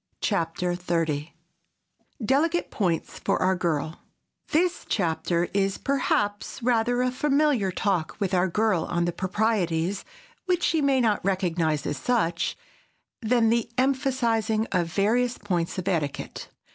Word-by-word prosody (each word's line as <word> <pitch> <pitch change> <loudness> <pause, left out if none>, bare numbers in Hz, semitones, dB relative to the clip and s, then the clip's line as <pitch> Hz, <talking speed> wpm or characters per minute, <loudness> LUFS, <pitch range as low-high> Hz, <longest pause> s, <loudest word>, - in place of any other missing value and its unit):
CHAPTER 175 -2 -1
XXX 165 -4 -1 0.9
DELICATE 320 +8 +1
POINTS 175 -6 -1
FOR - - 0
OUR 185 +1 +3
GIRL 160 -3 -2 0.5
THIS 345 +3 +1
chapter 170 -2 0
is, 195 0 +1
perhaps, 205 -7 -1
rather 245 +1 +2
a 255 - +1
Familiar 275 -6 +2
Talk 185 -4 -1
with 195 -3 -1
Our 180 0 +3
Girl 200 -2 +1
on 170 0 0
the 175 - 0
proprieties—which 195 - -2
she 320 - +2
may 275 -2 +3
not 215 -4 +1
recognize 175 -5 0
as 145 - -2
such—than 225 - -1
the 235 0 +1
emphasizing 250 -5 +1
of 180 -3 +1
various 235 +6 +1
points 175 -5 -2
of 185 0 -4
etiquette. 155 -7 -2
200 Hz, 120 wpm, -26 LUFS, 175-245 Hz, 0.9 s, OUR